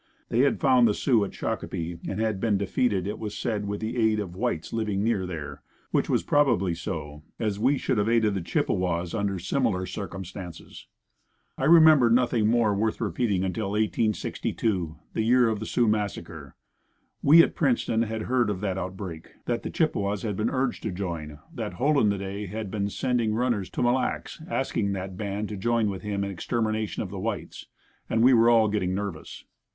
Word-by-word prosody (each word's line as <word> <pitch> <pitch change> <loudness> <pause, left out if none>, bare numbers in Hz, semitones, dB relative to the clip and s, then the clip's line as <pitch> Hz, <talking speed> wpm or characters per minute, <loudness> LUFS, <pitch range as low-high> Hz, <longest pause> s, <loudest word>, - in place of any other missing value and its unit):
They 115 - 0
had 140 +2 +3
found 125 -3 +5
the 105 - +1
Sioux 120 -6 +2
at 100 - -4
Shakopee 85 0 -4
and 100 - -3
had 110 -3 0
been 105 -1 +1
defeated, 100 -1 0
it 105 - -4
was 105 -2 -5
said 105 -3 -2
with 105 0 -3
the 110 +3 -3
aid 110 -2 +2
of 100 -4 -4
the - - -12
whites 80 - -2
living 105 -3 -1
near 100 -5 0
there, 80 -5 -6 0.3
which - - +1
was - - +2
probably 120 -12 +2
so, 75 -3 -5 0.2
as 105 -3 -2
we 135 +6 +3
should 120 - 0
have 105 +2 +1
aided 115 -3 +3
the 95 - -2
Chippewas 85 0 -1
under 100 -3 -1
similar 95 0 0
circumstances. 95 -1 -8 0.7
I 130 - -2
remember 155 -6 +7
nothing 115 -2 +3
more 115 -2 +3
worth 110 +2 0
repeating 105 -3 0
until 95 +1 -2
1862, 105 -4 -1 0.2
the - - 0
year 120 +2 +4
of 110 -2 -1
the 110 - -5
Sioux 120 -2 +2
massacre. 105 -2 -3 0.7
We, 165 +4 +8
at - - -1
Princeton, 120 -5 +1
had 110 -1 -2
heard 125 -3 +1
of 100 -3 -2
that 95 -2 -1
outbreak, 95 -4 -7
that - - -1
the - - -5
Chippewas 100 0 0
had 105 -3 -2
been 110 +4 0
urged 130 -1 -1
to 110 - -3
join, 85 -5 -5 0.2
that - - -4
"Hole 140 +10 +2
in 105 - +4
the 100 - 0
day" 100 +1 -5
had 105 0 -5
been 100 -1 -1
sending 120 -1 0
runners 115 -5 0
to - - -2
Mille 120 0 +4
Lacs 130 +4 -2
asking 105 - -1
that 95 -1 -5
band 100 +1 -3
to 105 - -5
join 115 +1 +1
with 95 - -6
him 100 -1 -2
in 100 - -3
extermination 110 +2 -2
of 95 - -7
the 100 - -5
whites, 105 -3 -5 0.4
and 115 +1 +2
we 130 +1 +7
were 115 0 +6
all 115 -2 +5
getting 95 -3 -1
nervous. 100 -6 -6
105 Hz, 195 wpm, -26 LUFS, 95-115 Hz, 0.7 s, We